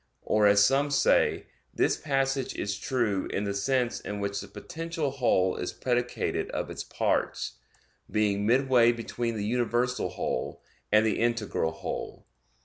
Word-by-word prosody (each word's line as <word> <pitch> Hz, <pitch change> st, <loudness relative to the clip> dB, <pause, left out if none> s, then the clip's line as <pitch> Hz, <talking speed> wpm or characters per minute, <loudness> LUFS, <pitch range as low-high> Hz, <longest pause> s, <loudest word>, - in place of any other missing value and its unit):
Or, 105 Hz, -1 st, +3 dB
as 100 Hz, 0 st, +6 dB
some 140 Hz, +4 st, +2 dB
say, 140 Hz, -, +3 dB, 0.3 s
this -, -, +2 dB
passage 135 Hz, -2 st, -1 dB
is 100 Hz, 0 st, -2 dB
true 115 Hz, -7 st, 0 dB
in 100 Hz, -, -2 dB
the 100 Hz, -1 st, -2 dB
sense 120 Hz, +4 st, 0 dB
in 105 Hz, 0 st, -5 dB
which 100 Hz, 0 st, -2 dB
the -, -, -9 dB
potential 165 Hz, -3 st, -4 dB
whole 115 Hz, -9 st, +2 dB
is 90 Hz, -, -3 dB
predicated 125 Hz, -1 st, -1 dB
of -, -, -3 dB
its -, -, -5 dB
parts, -, -, -1 dB, 0.5 s
being 105 Hz, -1 st, +1 dB
midway 125 Hz, -1 st, +4 dB
between 115 Hz, 0 st, -3 dB
the 105 Hz, -, -2 dB
universal 120 Hz, +2 st, 0 dB
whole, -, -, -3 dB, 0.3 s
and 110 Hz, +1 st, +5 dB
the 110 Hz, -, +1 dB
integral 115 Hz, -8 st, 0 dB
whole. -, -, -6 dB
120 Hz, 145 wpm, -28 LUFS, 105-130 Hz, 0.5 s, as